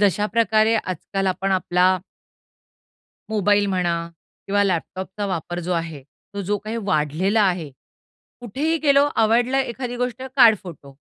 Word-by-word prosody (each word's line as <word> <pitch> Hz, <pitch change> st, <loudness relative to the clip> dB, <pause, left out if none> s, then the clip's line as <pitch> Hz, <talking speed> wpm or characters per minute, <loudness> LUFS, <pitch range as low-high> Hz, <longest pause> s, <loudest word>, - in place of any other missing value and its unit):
जश्याप्रकारे 215 Hz, +2 st, +2 dB
आजकाल 195 Hz, +1 st, -3 dB
आपण 190 Hz, +1 st, 0 dB
आपला 185 Hz, 0 st, +2 dB, 1.3 s
मोबाईल 205 Hz, -1 st, +2 dB
म्हणा 180 Hz, -3 st, 0 dB, 0.5 s
किंवा 205 Hz, +1 st, +2 dB
लॅपटॉपचा 190 Hz, +2 st, -3 dB
वापर 175 Hz, -1 st, -4 dB
जो 180 Hz, +2 st, -3 dB
आहे, 165 Hz, -5 st, -3 dB, 0.3 s
तो 200 Hz, -, -3 dB
जो 205 Hz, +3 st, -1 dB
काही 215 Hz, +3 st, -6 dB
वाढलेला 185 Hz, +4 st, +1 dB
आहे. 175 Hz, -6 st, 0 dB, 0.7 s
कुठेही 285 Hz, +8 st, -1 dB
गेलो, 280 Hz, -1 st, +5 dB
आवडला 240 Hz, +4 st, +3 dB
एखादी 245 Hz, -1 st, -4 dB
गोष्ट, 250 Hz, 0 st, -3 dB
काढ 235 Hz, -4 st, +8 dB
फोटो. 145 Hz, -6 st, -12 dB
200 Hz, 125 wpm, -22 LUFS, 180-225 Hz, 1.3 s, काढ